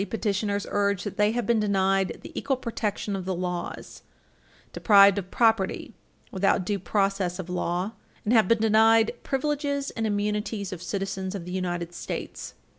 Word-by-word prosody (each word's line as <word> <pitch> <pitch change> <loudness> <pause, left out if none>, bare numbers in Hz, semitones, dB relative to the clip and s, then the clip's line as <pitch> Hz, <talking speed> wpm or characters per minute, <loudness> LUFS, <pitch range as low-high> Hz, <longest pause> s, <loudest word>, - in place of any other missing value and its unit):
8 - - -1
petitioners 205 -2 -1
urge 200 -1 +1
that 205 - -6
they 210 +1 +3
have 240 -2 -1
been 230 +1 +2
denied 195 -2 +1
the - - -9
equal 270 - -1
protection 215 -4 -3
of 190 -2 -5
the 190 -1 -1
laws, 180 -1 -5 0.7
deprived 200 -2 +6
of 185 -1 -8
property 225 -4 +1 0.4
without 190 -1 +1
due 200 +1 -1
process 195 -2 0
of 180 -2 -6
law, 180 +2 -1 0.3
and 215 - +2
have 220 -5 +5
been 230 - +4
denied 225 +1 +4
privileges 285 0 -1
and 225 -1 -2
immunities 210 -1 -2
of 175 - -8
citizens 190 +1 -3
of 180 -4 -6
the 180 - -7
United 175 -2 -3
States. - - -6
200 Hz, 165 wpm, -26 LUFS, 190-220 Hz, 0.7 s, deprived